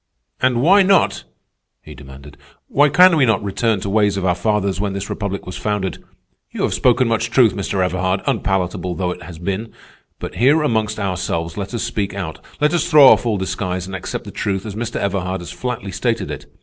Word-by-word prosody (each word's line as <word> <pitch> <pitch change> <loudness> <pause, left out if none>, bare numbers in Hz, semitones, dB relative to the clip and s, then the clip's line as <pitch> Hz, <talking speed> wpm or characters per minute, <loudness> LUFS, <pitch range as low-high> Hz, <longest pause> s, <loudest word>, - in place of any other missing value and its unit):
"And 125 -1 +2
why 195 +6 +6
not?" 195 -1 +2 0.6
he - - -11
demanded. 70 +1 -13 0.3
"Why 145 +1 +3
can 180 +4 +6
we 145 - +4
not 105 -3 +1
return 110 +2 0
to - - -6
the 100 - -3
ways 105 -2 +2
of 95 - -2
our 90 - +3
fathers 100 +1 -1
when 100 -1 -2
this 100 0 -5
republic 100 -2 -4
was 90 - -7
founded? 105 -3 -3 0.5
You - - -4
have - - 0
spoken 125 0 +3
much 115 0 0
truth, 120 -2 +4
Mr. 95 -1 -1
Everhard, 95 +1 -1
unpalatable 90 -2 -1
though 90 -1 -1
it 90 - -8
has 85 -2 -10
been. 100 +6 -4 0.5
But - - -7
here 145 +6 +4
amongst 110 -5 0
ourselves 90 -4 -2
let 100 +3 -5
us 115 - -2
speak 100 -2 -3
out. 90 -5 -6 0.2
Let 150 +3 +2
us 170 0 0
throw 150 -5 +8
off - - +4
all 110 -3 +1
disguise 95 -1 -3
and 95 +1 -7
accept 90 - -5
the - - -8
truth 95 0 -3
as 105 - -5
Mr. 120 +2 -5
Everhard 95 -1 -2
has 85 - -8
flatly 125 -5 -5
stated - - -2
it. - - -8
100 Hz, 210 wpm, -19 LUFS, 95-120 Hz, 0.6 s, throw